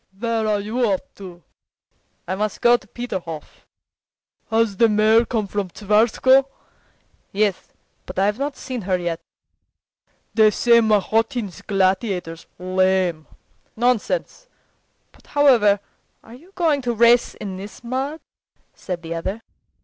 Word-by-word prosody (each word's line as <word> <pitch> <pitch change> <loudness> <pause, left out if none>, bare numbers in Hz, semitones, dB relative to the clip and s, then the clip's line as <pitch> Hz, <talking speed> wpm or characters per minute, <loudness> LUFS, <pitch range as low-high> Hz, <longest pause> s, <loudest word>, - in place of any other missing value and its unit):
"Where 225 0 -1
are 210 -1 +1
you 220 +5 -2
off 190 - 0 0.2
to?" 180 -3 -11 0.8
"I 185 - -2
must 210 +2 -2
go 240 0 +5
to 215 - -6
Peterhof." 185 -10 -7 0.8
"Has 225 -3 +1
the 230 +1 +5
mare 215 +2 +4
come 220 -4 -1
from 200 -1 -3
Tsarskoe?" 225 +7 +3 0.8
"Yes, 205 -2 0 0.4
but 185 - -8
I've 205 +4 +1
not 280 0 -3
seen 255 -3 -5
her 185 -1 0
yet." 175 -2 -3 1.1
"They 220 -1 +5
say 235 +2 +4
Mahotin's 220 -2 0
Gladiator's 185 -4 -1
lame." 185 -3 0 0.5
"Nonsense! 250 - -1 0.6
But - - -24
however 235 -9 +4 0.4
are 225 - -14
you 325 +10 -16
going 320 -6 +1
to 240 -2 -2
race 235 +2 +4
in 195 -3 -6
this 200 +5 -10
mud?" 265 +6 -3 0.5
said 175 -2 -6
the 165 0 -5
other. 190 +7 -4
215 Hz, 125 wpm, -21 LUFS, 190-240 Hz, 1.1 s, go